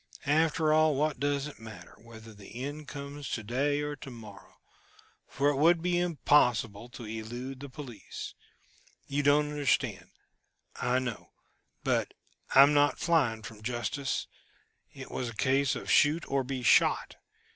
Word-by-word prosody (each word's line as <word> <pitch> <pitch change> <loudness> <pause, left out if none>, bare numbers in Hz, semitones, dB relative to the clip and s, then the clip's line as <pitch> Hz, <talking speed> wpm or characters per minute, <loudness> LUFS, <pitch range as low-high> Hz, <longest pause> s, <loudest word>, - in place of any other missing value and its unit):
After 155 +1 +2
all, 155 -1 +4
what 150 -1 0
does 140 0 0
it 150 - -9
matter, 110 -6 -11
whether 115 -1 -13
the 105 +3 -11
end 145 +2 -6
comes 140 0 -7
to 110 - -3
day 140 +6 0
or 145 0 -3
to 135 - -9
morrow, 110 -5 -13 0.7
for 140 +1 +1
it 140 - -3
would 165 +4 +5
be 175 +1 0
impossible 125 -10 +2
to 120 -1 -9
elude 120 +4 -6
the 140 0 -8
police. 130 -7 -8 0.7
You 140 +1 -1
don't 145 +1 +3
understand, 145 -2 0 0.7
I 125 +1 +1
know 125 -4 -4 0.5
but - - 0 0.4
I 135 - +11
am 145 +1 +4
not 145 0 +3
flying 130 -11 +1
from 105 -1 -10
justice: 120 +4 -2 0.7
it - - -10
was 125 - -3
a 115 - -10
case 135 +4 +2
of - - -4
shoot 150 +3 +4
or 135 -1 0
be 130 -1 -4
shot. 110 - +3
135 Hz, 155 wpm, -29 LUFS, 120-145 Hz, 0.7 s, I